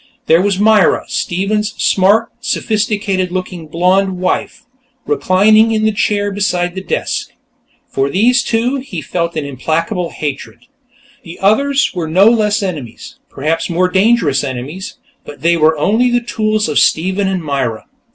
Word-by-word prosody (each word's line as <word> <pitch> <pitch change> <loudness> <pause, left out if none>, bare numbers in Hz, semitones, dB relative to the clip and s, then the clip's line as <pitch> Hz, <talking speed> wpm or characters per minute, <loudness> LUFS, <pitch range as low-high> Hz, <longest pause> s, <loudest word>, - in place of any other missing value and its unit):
There 165 +2 +4
was 200 -1 0
Myra, 210 -3 +3
Stephen's 205 +4 -2
smart, 205 +4 +2
sophisticated 205 -5 -1
looking 180 -3 -5
blonde 185 +4 +1
wife, 185 +1 -2 0.4
reclining 215 - +3
in 215 0 +1
a - - +2
chair 205 -1 0
beside 180 -3 -1
the 190 - -5
desk. - - -3 0.6
For 135 +1 -1
these 240 - +3
two, 240 +4 0
he 255 -10 -6
felt 170 -1 -3
an 155 -2 -3
implacable 165 +5 -2
hatred. 145 - -6 0.6
The 170 -1 -11
others 275 +8 +2
were 175 -4 -3
no 185 +5 +4
less 215 -2 +2
enemies, 150 - -7
perhaps 160 +5 -2
more 180 +2 +1
dangerous 190 - +2
enemies, 140 +8 -6 0.3
but 145 - -12
they 170 +1 +3
were 160 -1 +3
only 220 +11 +2
the 245 0 +2
tools 215 -2 -1
of 150 - +1
Stephen 190 +4 +1
and 190 -3 -2
Myra. 135 -7 -2
190 Hz, 145 wpm, -15 LUFS, 165-215 Hz, 0.6 s, There